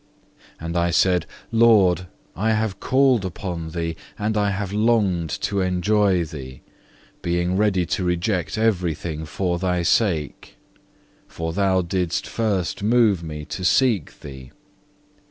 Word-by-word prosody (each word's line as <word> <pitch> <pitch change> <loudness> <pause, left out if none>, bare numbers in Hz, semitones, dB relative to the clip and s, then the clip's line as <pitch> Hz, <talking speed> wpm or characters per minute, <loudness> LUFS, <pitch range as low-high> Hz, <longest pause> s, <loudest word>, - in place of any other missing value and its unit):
7. - - -10
And 85 +1 -2
I 85 0 +2
said 90 0 +2 0.2
Lord, 105 -6 +4 0.3
I 110 +4 +1
have 110 -3 -1
called 130 -5 +3
upon 90 -3 -5
Thee, 85 0 -3 0.2
and 110 0 -1
I 105 -1 +2
have 100 0 -3
longed 105 -7 +1
to 100 -1 0
enjoy 95 0 +2
Thee, 65 -5 -9 0.6
being 85 +1 0
ready 95 -3 +2
to 90 - -2
reject 90 -1 -1
everything 85 -7 -1
for 85 +2 -2
Thy 90 -1 0
sake. 85 -7 0 0.7
For 80 0 -5
Thou 95 -1 +2
didst 90 -1 -1
first 100 -8 -2
move 110 -4 +3
me 75 -2 -7
to 90 - -6
seek 110 - +1
Thee. 65 -2 -10
90 Hz, 135 wpm, -22 LUFS, 85-105 Hz, 0.7 s, Lord